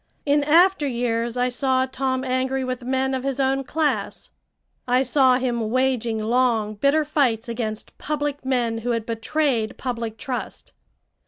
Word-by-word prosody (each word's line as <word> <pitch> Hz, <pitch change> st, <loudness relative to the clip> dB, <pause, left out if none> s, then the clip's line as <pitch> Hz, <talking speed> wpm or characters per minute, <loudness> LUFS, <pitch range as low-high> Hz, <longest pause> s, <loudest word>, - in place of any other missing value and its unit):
In 290 Hz, 0 st, +3 dB
after 335 Hz, +1 st, +4 dB
years 235 Hz, -1 st, -1 dB
I 250 Hz, 0 st, +2 dB
saw 260 Hz, +1 st, +1 dB
Tom 260 Hz, 0 st, -2 dB
angry 260 Hz, +1 st, -1 dB
with 255 Hz, -1 st, -3 dB
men 265 Hz, +2 st, -1 dB
of 260 Hz, -, -1 dB
his 275 Hz, -1 st, -2 dB
own 270 Hz, 0 st, +1 dB
class; 305 Hz, +2 st, -2 dB, 0.6 s
I 250 Hz, +1 st, +3 dB
saw 260 Hz, -1 st, +4 dB
him 240 Hz, -4 st, -1 dB
waging 245 Hz, -2 st, 0 dB
long, 225 Hz, -1 st, +1 dB
bitter 280 Hz, +8 st, +2 dB
fights 260 Hz, -6 st, +1 dB
against 225 Hz, -2 st, -5 dB
public 290 Hz, -2 st, -3 dB
men 240 Hz, -4 st, 0 dB
who 240 Hz, +1 st, -1 dB
had 230 Hz, -2 st, -2 dB
betrayed 230 Hz, 0 st, -1 dB
public 230 Hz, -3 st, -4 dB
trust. 255 Hz, +1 st, -6 dB
255 Hz, 150 wpm, -23 LUFS, 235-270 Hz, 0.6 s, after